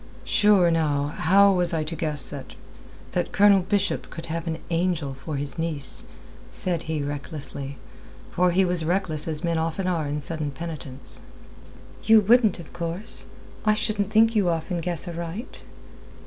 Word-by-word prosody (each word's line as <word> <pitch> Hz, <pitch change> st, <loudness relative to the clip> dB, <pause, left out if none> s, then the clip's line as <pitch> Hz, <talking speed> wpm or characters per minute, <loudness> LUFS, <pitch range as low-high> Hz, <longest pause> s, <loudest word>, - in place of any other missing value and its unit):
"Sure, 200 Hz, -5 st, +4 dB
now, 145 Hz, -3 st, +1 dB
how 195 Hz, +6 st, +4 dB
was 175 Hz, -2 st, +1 dB
I 155 Hz, -, 0 dB
to 160 Hz, +2 st, -4 dB
guess 150 Hz, -5 st, -2 dB
that... 140 Hz, -2 st, -8 dB, 0.6 s
that 180 Hz, -1 st, -1 dB
Colonel 200 Hz, 0 st, +6 dB
Bishop 200 Hz, +1 st, -1 dB
could 165 Hz, -, -7 dB
have 165 Hz, +1 st, -4 dB
an 160 Hz, -1 st, -2 dB
angel 165 Hz, -5 st, 0 dB
for 135 Hz, +3 st, -6 dB
his 140 Hz, +3 st, 0 dB
niece?" 155 Hz, -5 st, -2 dB, 0.4 s
said 175 Hz, -3 st, 0 dB
he 155 Hz, -2 st, -1 dB
recklessly, 140 Hz, -1 st, -5 dB, 0.5 s
for 180 Hz, +1 st, +3 dB
he 185 Hz, +2 st, +3 dB
was 175 Hz, -2 st, 0 dB
reckless 170 Hz, -3 st, -1 dB
as 155 Hz, +1 st, -2 dB
men 170 Hz, -1 st, +1 dB
often 165 Hz, +4 st, -2 dB
are 170 Hz, -5 st, 0 dB
in 145 Hz, +1 st, -2 dB
sudden 155 Hz, 0 st, -3 dB
penitence. 135 Hz, -4 st, -8 dB, 0.8 s
"You 225 Hz, 0 st, +7 dB
wouldn't, 220 Hz, -1 st, +4 dB
of 170 Hz, -3 st, -11 dB
course. 175 Hz, +5 st, -3 dB, 0.4 s
I 215 Hz, 0 st, +3 dB
shouldn't 210 Hz, -2 st, -1 dB
think 225 Hz, +1 st, +4 dB
you 200 Hz, -4 st, +3 dB
often 170 Hz, +2 st, -1 dB
guess 170 Hz, 0 st, -2 dB
aright." 170 Hz, +6 st, -6 dB
170 Hz, 160 wpm, -25 LUFS, 155-185 Hz, 0.8 s, You